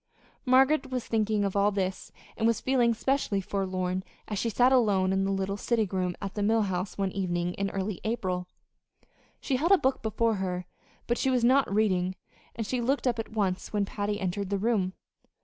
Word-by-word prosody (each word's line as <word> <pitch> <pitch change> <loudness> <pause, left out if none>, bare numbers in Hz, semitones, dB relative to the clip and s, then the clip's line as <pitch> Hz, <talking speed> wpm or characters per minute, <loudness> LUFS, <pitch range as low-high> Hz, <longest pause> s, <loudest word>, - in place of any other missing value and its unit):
Margaret 265 +2 +4
was 255 -2 -3
thinking 215 -2 +1
of 195 - -2
all 200 +1 +4
this, 190 -2 -3 0.2
and 225 - +1
was 230 -2 +2
feeling 245 -3 +2
specially 265 -5 0
forlorn 185 -1 -2 0.2
as 210 -2 -3
she 230 - 0
sat 245 +4 +4
alone 200 -7 +3
in 195 0 +1
the 195 - 0
little 195 +1 -1
sitting 220 -1 0
room 180 -2 -1
at 195 -2 -5
the 210 - -3
Mill 220 +2 +3
House 185 -1 -3
one 195 -1 0
evening 175 -2 -1
in 195 +1 -2
early 195 0 -3
April. 185 -5 -2 0.9
She 265 - -1
held 330 +8 +1
a - - +7
book 265 -4 0
before 220 0 0
her, 180 -1 -3 0.4
but 240 - 0
she 265 - +1
was 250 -2 +2
not 260 +1 +4
reading; 185 -3 +1 0.4
and 225 - -3
she 250 +3 -1
looked 270 +4 0
up 240 -2 +1
at 225 - -5
once 195 -3 -1
when 205 -1 +1
Patty 205 +1 -3
entered 190 0 -2
the 200 - 0
room. 200 -3 0
205 Hz, 200 wpm, -28 LUFS, 190-235 Hz, 0.9 s, a